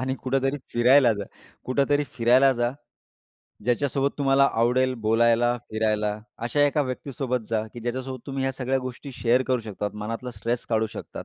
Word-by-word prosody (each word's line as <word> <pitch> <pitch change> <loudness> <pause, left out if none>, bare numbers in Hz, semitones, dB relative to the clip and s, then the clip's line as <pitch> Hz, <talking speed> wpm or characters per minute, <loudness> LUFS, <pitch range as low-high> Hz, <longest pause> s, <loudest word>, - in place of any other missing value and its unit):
आणि 130 +1 -1
कुठेतरी 135 +2 0
फिरायला 125 +1 +5
जा 100 -1 -5 0.4
कुठेतरी 145 +2 +1
फिरायला 130 +3 +5
जा. 120 -1 0 0.9
ज्याच्यासोबत 135 +2 +1
तुम्हाला 140 0 +4
आवडेल 125 +3 +2
बोलायला, 120 +2 +3
फिरायला, 105 -1 0 0.2
अशा 120 +5 -1
एका 145 +1 +1
व्यक्तीसोबत 130 -2 -3
जा, 110 -1 0
की 120 - -7
ज्याच्यासोबत 130 +2 -4
तुम्ही 135 -1 -3
ह्या 135 - 0
सगळ्या 130 0 -1
गोष्टी 130 +2 -7
शेअर 125 +1 +2
करू 125 -2 +2
शकतात. 105 -2 -4
मनातला 115 +4 -5
स्ट्रेस 115 +3 -3
काढू 110 -1 +1
शकतात - - -7
125 Hz, 155 wpm, -25 LUFS, 115-135 Hz, 0.9 s, फिरायला